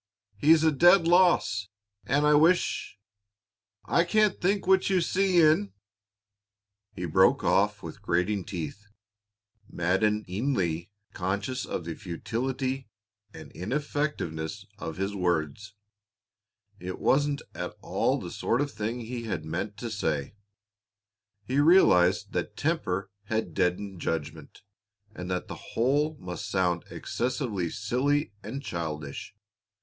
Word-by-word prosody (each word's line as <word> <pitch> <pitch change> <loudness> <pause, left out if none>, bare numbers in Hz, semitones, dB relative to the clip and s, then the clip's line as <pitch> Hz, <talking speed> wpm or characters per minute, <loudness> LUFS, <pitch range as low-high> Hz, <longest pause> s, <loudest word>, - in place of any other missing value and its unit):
He's 155 +8 +5
a 160 - +5
dead 170 +4 +6
loss, 170 - +3 0.4
and 145 +3 +2
I 150 - +5
wish 160 - +2 0.9
I 170 - +3
can't 215 +3 +2
think 195 +2 +1
what 190 +1 +4
you 190 -1 +3
see 185 +1 +2
in 155 - +4 0.6
" 100 0 -60
He 90 - -4
broke 80 - +4
off - - +2
with - - -8
grating 90 +3 0
teeth, 90 +4 -6 0.8
maddeningly 95 - 0 0.2
conscious 100 +7 -2
of 85 - -4
the 85 - -4
futility 130 - -3 0.4
and - - -11
ineffectiveness 105 - -3
of 80 -5 -5
his 95 +2 -2
words. 90 +2 -1 1.0
It 90 +1 -5
wasn't 145 +1 +1
at - - -5
all - - +1
the - - -7
sort 120 - 0
of 145 0 -1
thing 115 +2 -3
he 120 0 -5
had 90 -8 -3
meant 90 +6 -4
to 115 +1 -5
say. 80 -9 -2 1.1
He 130 +5 0
realized 105 - +5
that 105 - -3
temper 100 - -1
had 110 +2 -2
deadened 95 0 -1
judgment, 80 +2 -4 0.5
and 90 -2 -7
that 90 -1 -2
the - - -6 0.2
whole 145 +6 +2
must 90 +3 -6
sound 90 -3 0
excessively 120 - -2
silly 125 - 0
and 140 +5 -6
childish. 80 - -5
105 Hz, 125 wpm, -28 LUFS, 90-145 Hz, 1.1 s, dead